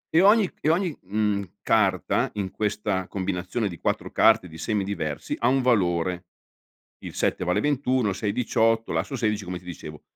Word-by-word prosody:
E 160 - +6
ogni 205 +2 +6
c - - -30
e 155 - 0
ogni, 170 0 +1
mhmm, 105 +1 0 0.2
carta 105 -4 +2
in 100 -3 -3
questa 105 -2 -1
combinazione 95 +3 -2
di 85 - -8
4 - - -2
carte 110 -5 +4
di 80 - -11
semi 105 +4 -1
diversi, 85 -7 -3
ha 120 - +2
un 135 +2 +3
valore. 90 -7 +1 0.8
Il - - -7
7 - - 0
vale 90 +1 +1
21, 130 -5 +1
il 95 - -2
6 100 +1 -2
18, 115 -1 +1
l'asso 140 - -2
16, 105 -4 -1
come 90 0 -4
ti - - -22
dicevo. 75 -3 -9
105 Hz, 185 wpm, -25 LUFS, 90-120 Hz, 0.8 s, E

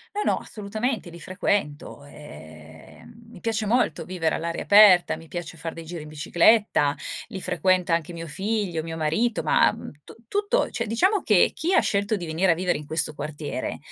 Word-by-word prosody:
No, 420 - -1
no, - - +1
assolutamente, 215 0 -4
li 170 0 -11
frequento, 180 -7 -3
e, 80 - -13
ehm, - - -15 0.2
mi - - -13
piace 225 -1 -2
molto 210 -6 0
vivere 175 -3 -1
all'aria 170 +1 -3
aperta, 200 -5 +6
mi 165 0 -14
piace 170 -1 -6
far 165 +1 -5
dei 165 -1 -9
giri 170 -1 -7
in 150 - -10
bicicletta, 160 0 +2 0.3
li 190 - -7
frequenta 180 -1 +1
anche 170 +1 -2
mio 165 0 -7
figlio, 190 0 -2
mio 165 0 -6
marito, 210 +10 0
ma - - +4 0.3
tu - - -14
tutto 410 - 0
cioè, 235 -1 -3
diciamo 375 - +2
che 210 -5 +3
chi 350 +4 -1
ha - - +6
scelto 200 +2 0
di 175 -3 -6
venire 165 +4 +1
a - - +5
vivere 180 0 0
in 150 - -10
questo 155 0 -1
quartiere 150 0 -5
175 Hz, 185 wpm, -24 LUFS, 160-215 Hz, 0.3 s, aperta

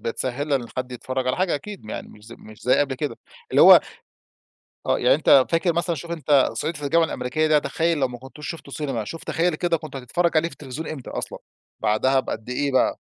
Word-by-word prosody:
بتسهل 130 +5 -3
إن 125 -4 +1
حد 125 0 -3
يتفرج 130 +1 -3
على 130 - +1
حاجة 185 -3 +1
أكيد 190 - -7
م 110 - -9
يعني - - -6
مش 105 0 -16
ز 120 - -11
مش 110 -2 -14
زي 125 - +3
قبل 140 -2 +1
كده. 145 +2 -4 0.3
اللي - - +5
هو - - +10 1.1
آه - - +2
يعني - - +4
أنت 130 -2 +5
فاكر 165 +1 +2
مثلًا 170 0 -1
شوف 170 +3 -8
أنت 145 -5 +3
صعيدي 160 -1 -3
في 145 - -7
الجامعة 165 +4 +3
الأمريكية 155 +5 -1
ده 155 -1 +4
تخيل 160 +3 0
لو 130 -2 +1
ما 120 -1 -8
كنتوش 135 +4 -10
شفته 160 -4 -9
سينما، 135 -8 -3
شوف 165 +9 -8
تخيل 170 0 0
كده 170 +1 0
كنت 155 -3 -9
هتتفرج 165 +7 0
عليه 165 +2 +3
في - - -16
التلفزيون 145 +3 -7
إمتى 140 -5 -7
أصلًا؟ - - -5 0.4
بعدها 130 +5 +2
بقد 110 -2 -6
إيه 140 +2 -1
بقى؟ 130 - +2
145 Hz, 225 wpm, -23 LUFS, 130-165 Hz, 1.1 s, هو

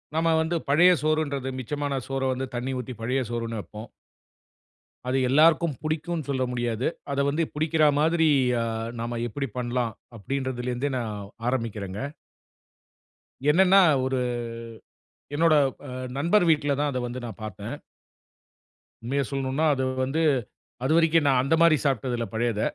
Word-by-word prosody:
நாம 165 0 +2
வந்து 165 +2 -1
பழைய 175 +6 +6
சோறுன்றது, 145 -4 0
மிச்சமான 145 +1 -2
சோற 135 0 -2
வந்து 130 +1 -3
தண்ணீ 125 +2 -2
ஊத்தி 125 +1 -6
பழைய 125 +4 0
சோறுன்னு 115 -2 -3
வப்போம். 105 +5 -10 1.2
அது 130 +1 +1
எல்லாருக்கும் 155 +2 +4
புடிக்குன்னு 155 0 -2
சொல்ல 130 -2 0
முடியாது. 120 -1 -1 0.2
அத 140 - -1
வந்து 155 +4 0
புடிக்கிறா 155 0 +2
மாதிரி 160 0 +3 0.3
அ - - 0 0.4
நாம 120 0 -3
எப்புடி 135 +4 -4
பண்ணலாம், 120 -2 -1 0.2
அப்படின்றதுல 130 +1 -3
இருந்தே, 135 +3 -2
நான் 115 -3 -3 0.4
ஆரம்பிக்கிறேன்ங்க. 110 -2 -3 1.4
என்னென்னா 190 +4 +6 0.3
ஒரு 130 0 0 1.2
என்னோட 165 0 +4 0.3
அ 130 - -7 0.3
நண்பர் 170 +8 +3
வீட்ல 145 -3 +2
தான் 145 0 +1
அத 125 - -2
வந்து 120 +1 -6
நான் 110 -2 -9
பார்த்தேன். 110 - -6 1.3
உண்மைய 135 +4 -1
சொல்ணுன்னா, 135 +3 -1
அது 130 - -1 0.2
வந்து 140 +5 -1 0.6
அதுவரைக்கும், 160 +1 +3
நான் 130 -2 +4
அந்த 145 +5 +2
மாதிரி 165 -2 +6
சாப்ட்டதில்ல 125 -3 0
பழையத. 110 -1 0
135 Hz, 130 wpm, -26 LUFS, 120-155 Hz, 1.4 s, பழைய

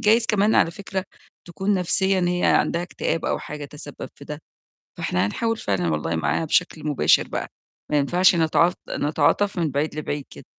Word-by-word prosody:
جايز 225 +2 +4
كمان 210 +1 +2
على 165 - +4
فكرة 190 +1 -5 0.4
تكون 190 +4 -1
نَفْسيًا 190 +1 +1
هي 180 0 0
عندها 170 +1 +2
اكتئاب 165 -2 -3
أو - - 0
حاجة 150 -1 -7
تسبَّب 145 0 -9
في 140 - -13
ده، 150 +1 -7 0.6
فإحنا 90 +1 0
هنحاول 225 - -1
فعلًا 95 - -1
والله 80 +2 -1
معاها 120 - 0
بشكل 155 0 0
مباشر 145 - +3
بقى، - - -4 0.4
ما 150 - +3
ينفعش 175 +6 +4
نتعاط 170 +2 +3
نتعاطف 155 +7 +1
من 160 -3 0
بعيد 145 +3 -1
لبعيد 145 -2 -4
كده. - - -12
165 Hz, 170 wpm, -23 LUFS, 145-190 Hz, 0.6 s, جايز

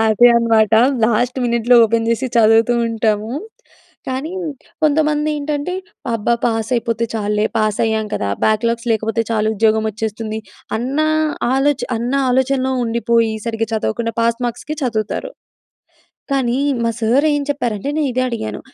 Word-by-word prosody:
Happy 220 +2 +5
అనమాట. 225 -2 +3 0.3
Last 240 +3 +1
మినెట్‌లో 235 0 +3
open 225 +1 0
చేసి 240 +3 0
చదువుతూ 225 +1 +4
ఉంటాము. 220 -1 -1 0.8
కానీ 265 +6 -3 0.5
కొంతమంది 305 0 +2
ఏంటంటే 295 +4 -3 0.4
అబ్బా! 230 +2 +1
పాస్ 225 -1 -1
అయిపోతే 230 -1 -1
చాల్లే, 210 -1 0
పాస్ 215 -1 0
అయ్యాం 220 -1 -1
కదా! 100 - -2 0.2
బ్యాక్‌లాగ్స్ 230 +2 0
లేకపోతే 225 +1 0
చాలు 215 -1 +1
ఉద్యోగం 220 +1 +2
వచ్చేస్తుంది. 220 +1 -4 0.4
అన్న 260 +5 -3 0.6
ఆలోచన 275 +1 +1
అన్న 245 +3 -2 0.2
ఆలోచనలో 265 +1 +1
ఉండిపోయి 230 -1 +1
సరిగ్గా 225 -1 -2
చదవకుండా 230 +1 -2
పాస్ 230 +1 +1
మార్క్స్‌కి 300 +6 -5
చదువుతారు. 225 - -2 1.0
కానీ, 255 -3 +1 0.3
మా 230 - +2
సార్ 240 +6 +2
ఏం 290 0 0
చెప్పారంటే, 245 -5 -2
నే 315 - +1
ఇదే 255 +1 0
అడిగాను 110 - -4
230 Hz, 130 wpm, -18 LUFS, 220-255 Hz, 1.0 s, Happy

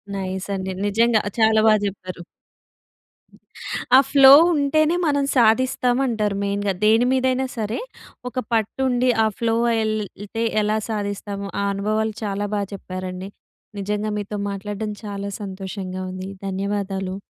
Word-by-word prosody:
Nice 190 0 -4
అండి. 190 0 -3
నిజంగా 225 +2 +3 0.2
చాలా 220 0 +5
బాగా 215 -1 +5
చెప్పారు. 185 -2 -7 1.8
ఆ - - +9
ఫ్లో 270 -1 +8 0.2
ఉంటేనే 310 +3 +2
మనం 285 -1 +2
సాధిస్తాం 245 +2 +3
అంటారు. 210 -4 -1
మెయిన్‌గా 200 0 -1
దేని 225 +3 +5
మీదైనా 260 0 +1
సరే 215 0 -2 0.5
ఒక 250 - -24 0.2
పట్టు 225 +3 0
ఉండి 250 0 +2
ఆ - - +3
ఫ్లో 230 -1 +1 0.3
ఎల్ 215 0 0 0.3
ఎళ్తే 225 +3 -4 0.2
ఎలా 210 +1 +1
సాధిస్తాము? 205 -1 -4
ఆ - - 0
అనుభవాలు 215 +2 -1
చాలా 205 0 -2
బాగా 200 -1 -1
చెప్పారండి. 185 0 -6 0.5
నిజంగా 210 +2 -2
మీతో 205 +1 -5
మాట్లాడం 205 +2 -4 0.2
చాలా 200 -1 -4
సంతోషంగా 190 -1 -5
ఉంది. 185 +1 -6 0.2
ధన్యవాదాలు. 195 0 -3
205 Hz, 130 wpm, -22 LUFS, 195-225 Hz, 1.8 s, ఆ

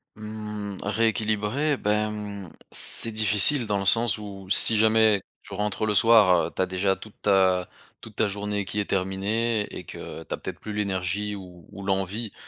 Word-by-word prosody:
Mmh, 105 -1 -10
rééquilibrer, 110 +6 -3
ben, 105 +1 -4
mmh, 100 -4 -11 0.2
c'est 115 -1 +10
difficile 110 +5 +4
dans 105 -1 -4
le 100 - -7
sens 115 +1 -1
où 100 -2 -12
si 110 +2 +8
jamais 110 -2 0 0.2
tu - - -16
rentres 105 +1 -5
le 105 - -3
soir, 105 -5 +2
heu, - - -13
tu - - -6
as 95 - -1
déjà 95 +1 -3
toute 110 - -16
ta 95 -2 -1 0.3
toute 110 -2 -16
ta 110 - -1
journée 100 0 -6
qui 105 +2 -6
est - - -7
terminée 105 +4 -4
et - - -11
que - - -12
tu - - -10
as - - -6
peut-être - - -11
plus 105 - -10
l'énergie 100 0 -5
ou 90 -4 -15
ou 100 - -13
l'envie 100 +3 -5
105 Hz, 185 wpm, -22 LUFS, 95-110 Hz, 0.3 s, c'est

